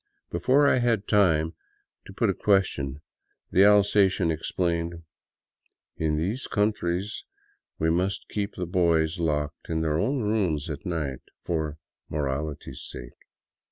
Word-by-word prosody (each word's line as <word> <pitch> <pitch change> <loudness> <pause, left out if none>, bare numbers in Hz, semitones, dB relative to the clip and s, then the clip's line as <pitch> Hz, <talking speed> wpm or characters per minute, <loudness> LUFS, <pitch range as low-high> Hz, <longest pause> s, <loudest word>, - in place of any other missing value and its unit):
Before 140 +3 +3
I 130 - +4
had 115 -4 +1
time 85 -6 +3 0.5
to 95 - -10
put 105 0 +2
a - - -3
question, 75 -9 +1 0.5
the 95 - +5
Alsatian 100 -3 +4
explained: 85 +1 -2 0.5
" - - -50
In 75 -1 +1
these 100 +12 -2
countries 105 -2 -1 0.5
we 80 +1 +1
must 90 +3 -1
keep 100 -1 -3
the 90 - -3
boys 85 -2 +2
locked 75 -3 -2
in 80 -1 0
their 80 -1 +1
own 130 +5 0
rooms 95 -9 0
at 75 +5 -6
night, 75 -7 -3 0.2
for 80 -3 -2 0.3
morality's 75 0 -3
sake." - - -9
85 Hz, 130 wpm, -26 LUFS, 80-100 Hz, 0.5 s, the